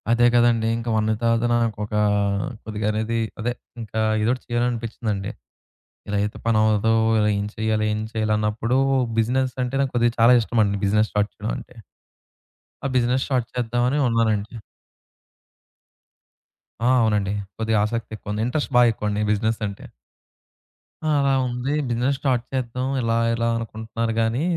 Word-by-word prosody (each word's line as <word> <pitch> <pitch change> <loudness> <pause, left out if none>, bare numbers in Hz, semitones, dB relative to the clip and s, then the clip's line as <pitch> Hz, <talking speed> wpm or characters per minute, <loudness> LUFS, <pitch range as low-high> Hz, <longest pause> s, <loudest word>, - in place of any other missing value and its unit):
అదే 120 +1 +4
కదండీ! 120 -2 +3
ఇంకా 115 0 -4
వన్నీతతనా 115 +2 +1
నాకొక 105 -2 -3 0.7
కొద్దిగా 105 -1 -3
అనేది 110 +2 -1 0.2
అదే 120 +2 -1 0.3
ఇంకా 110 0 -4 0.2
ఏదో 110 - +2
ఒకటి 130 - -8
చేయాలని 120 0 +1
అనిపిచ్చిందండి. 110 -4 -3 0.8
ఇలా 100 - 0
అయితే 105 +1 -3
పని 115 -1 +3
అవ్వదు 110 +1 +3 0.4
ఏం 100 - -1
చేయాలి, 110 -1 0
ఏం 105 - -2
చేయాలి, 110 -1 0
అన్నప్పుడు 110 +4 0 0.4
బిజినెస్ 125 +3 +1
అంటే 125 +2 -3
నాకు 135 -1 0
కొద్దిగా 120 -1 +2
చాలా 115 +2 +7
ఇష్టమండి. 110 -3 +1
బిజినెస్ 105 +2 +2
స్టార్ట్ 105 0 0
చేయడం - - -4
అంటే, - - -12 1.1
ఆ - - +2
బిజినెస్ 125 +2 +1
స్టార్ట్ 125 -4 0
చేద్దామని 120 +3 0
అని - - +3
ఉన్నానండి. 110 -2 0 2.3
ఆ! - - +5
అవునండి. 105 -3 +1 0.2
కొద్దిగా 110 -1 +1
ఆసక్తి 115 +1 -4
ఎక్కువ 105 -1 -7
ఉంది. 105 +1 -1
ఇంట్రెస్ట్ 145 +1 -2
బా 125 - +7
ఎక్కువండి 105 -1 -2
బిజినెస్ 110 +1 0
అంటే. 100 0 -9 1.2
ఆ! - - +3
అలా 140 -1 +2
ఉంది. 125 +3 -2 0.2
బిజినెస్ 125 +4 0
స్టార్ట్ 125 -4 +1
చేద్దాం 125 0 -2
ఇలా 115 -1 0 0.2
ఇలా 115 0 0
అనుకుంటున్నాను 115 0 -4
గాని, 115 +5 0
115 Hz, 145 wpm, -23 LUFS, 110-120 Hz, 2.3 s, చాలా